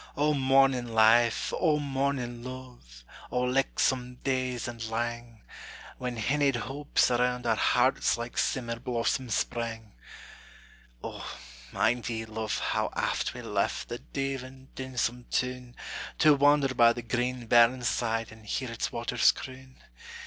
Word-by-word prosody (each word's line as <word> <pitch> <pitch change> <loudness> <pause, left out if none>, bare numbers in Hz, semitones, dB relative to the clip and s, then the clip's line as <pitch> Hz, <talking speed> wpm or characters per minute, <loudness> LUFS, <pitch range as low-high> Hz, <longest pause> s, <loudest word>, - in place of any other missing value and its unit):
O 150 +1 +3
mornin' 135 -3 +3
life! 115 +1 +4
O 155 -4 +2
mornin' 135 -4 -2
luve! 125 - -10 0.3
O 125 - 0
lichtsome 125 -1 0
days 130 -3 -1
and 115 -2 -6
lang, 120 0 -4 0.6
When 125 -1 -3
hinnied 140 +4 +1
hopes 135 +3 0
around 125 0 +1
our 115 -2 +3
hearts - - +2
Like 120 +1 -6
simmer 115 -3 -1
blossoms 120 -1 -1
sprang! 115 -2 -3 1.1
O, - - -6 0.4
mind 120 0 +1
ye, 110 -1 -3
luve, 110 0 -3
how - - -1
aft - - -1
we - - -7
left - - -1
The 120 0 -5
deavin', 135 -1 -5
dinsome 125 -2 -3
toun, 125 -1 -2 0.4
To 155 -1 +6
wander 145 -1 +4
by 120 -2 +5
the 120 - -6
green 125 +1 -2
burnside, 115 -1 +2
And 110 0 -14
hear 130 +3 -2
its 115 - -3
waters 120 +1 +3
croon? 130 0 -10
125 Hz, 130 wpm, -28 LUFS, 115-130 Hz, 1.1 s, To